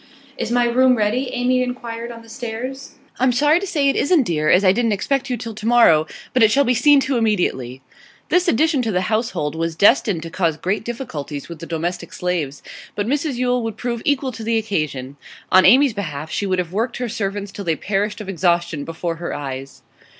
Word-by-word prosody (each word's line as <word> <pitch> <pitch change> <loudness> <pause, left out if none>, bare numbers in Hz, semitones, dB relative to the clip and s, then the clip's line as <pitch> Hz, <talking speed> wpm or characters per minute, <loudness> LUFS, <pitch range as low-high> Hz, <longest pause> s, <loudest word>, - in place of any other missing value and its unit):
'Is 225 - -3
my 245 0 +2
room 250 +1 +3
ready?' 225 +5 0
Amy 255 +1 +1
inquired 240 -2 -5
on 230 -1 -11
the - - -17
stairs. 245 +3 -6 0.3
'I'm 255 0 +3
sorry 295 +6 +3
to 395 - -5
say 295 -6 +1
it 275 - +2
isn't, 305 -1 +3
dear, 155 -7 0
as 190 +2 +4
I 185 - +7
didn't 230 +1 +1
expect 275 +6 -1
you 250 - -1
till 230 0 -6
tomorrow. 215 -8 +4 0.3
But 255 - +2
it 220 - +7
shall 280 +5 +3
be 250 -1 +2
seen 280 +4 +5
to 265 -1 0
immediately.' 135 - -1 0.5
This 360 0 +2
addition 310 0 +2
to 225 -2 -1
the 180 -2 +1
household 215 -10 -1
was 165 0 -3
destined 200 -3 +3
to 165 - -8
cause 165 -4 0
grave 190 +7 -2
difficulties 155 - -6
with 170 -2 -8
the 165 - -8
domestic 170 +1 -4
slaves. 165 -6 -3 0.3
But 205 - -1
Mrs 285 +3 -1
Yule 250 0 0
would 225 -2 -4
prove 235 -1 -3
equal 275 -2 0
to 225 -1 -8
the 225 +1 +1
occasion. 150 -11 -3 0.3
On 185 0 +6
Amy's 265 0 +6
behalf 155 -6 -5
she 200 - -2
would 185 -1 0
have 180 -1 -3
worked 230 +5 -1
her 245 - -2
servants 205 -2 -4
till 200 0 -7
they 165 -2 +1
perished 205 +4 -2
of 210 - -7
exhaustion 170 -4 0
before 165 +1 -4
her 170 +1 -4
eyes. 135 -1 -7
220 Hz, 210 wpm, -20 LUFS, 170-250 Hz, 0.5 s, I